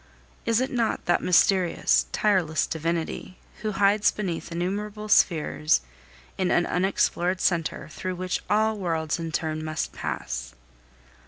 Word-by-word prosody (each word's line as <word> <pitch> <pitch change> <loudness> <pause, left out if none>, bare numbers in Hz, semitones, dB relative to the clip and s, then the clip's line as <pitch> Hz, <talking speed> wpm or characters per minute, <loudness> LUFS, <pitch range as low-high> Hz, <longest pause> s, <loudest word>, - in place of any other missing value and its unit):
Is 230 0 +3
it 260 - -1
not 235 -3 -1
that 175 - +2
mysterious, 180 0 +3
tireless 185 -7 +2
divinity, 165 +3 -3 0.2
who 215 -1 -2
hides 200 +1 +4
beneath 175 -5 -4
innumerable 205 +5 -3
spheres 160 -6 +3 0.6
in 185 -1 +1
an 175 - +3
unexplored 185 -1 +1
centre, 170 -4 0
through 185 +2 -4
which 185 0 -2
all 215 +2 +2
worlds 165 -3 -1
in 165 -1 -4
turn 155 -1 -2
must 155 0 -3
pass? - - -5
180 Hz, 130 wpm, -26 LUFS, 165-205 Hz, 0.6 s, hides